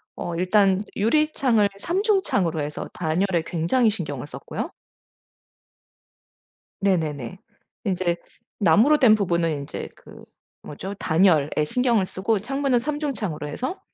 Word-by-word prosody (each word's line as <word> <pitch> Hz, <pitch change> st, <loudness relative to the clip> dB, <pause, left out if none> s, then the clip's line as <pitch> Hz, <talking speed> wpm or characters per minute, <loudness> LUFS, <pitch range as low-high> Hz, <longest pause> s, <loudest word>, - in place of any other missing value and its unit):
어 170 Hz, -, -4 dB
일단 190 Hz, +2 st, +3 dB
유리창을 235 Hz, -2 st, +2 dB
3 345 Hz, -, -1 dB
중창으로 265 Hz, -, +1 dB
해서 145 Hz, 0 st, -5 dB
단열에 175 Hz, +1 st, 0 dB
굉장히 180 Hz, +9 st, +2 dB
신경을 150 Hz, -, -4 dB
썼고요. -, -, -6 dB, 2.1 s
네네네. 160 Hz, -6 st, -1 dB, 0.5 s
인제 180 Hz, -3 st, 0 dB, 0.4 s
나무로 215 Hz, -, +5 dB
된 230 Hz, -5 st, +6 dB
부분은 170 Hz, -5 st, 0 dB
인제 140 Hz, -2 st, -5 dB
그 -, -, -15 dB, 0.4 s
뭐죠? 190 Hz, +7 st, -7 dB
단열에 160 Hz, -5 st, +3 dB, 0.2 s
신경을 235 Hz, +2 st, +1 dB
쓰고 195 Hz, +3 st, -1 dB
창문은 270 Hz, +3 st, 0 dB
3 290 Hz, +4 st, -3 dB
중창으로 210 Hz, -, -3 dB
해서 255 Hz, -, -4 dB
195 Hz, 255 characters per minute, -24 LUFS, 165-245 Hz, 2.1 s, 된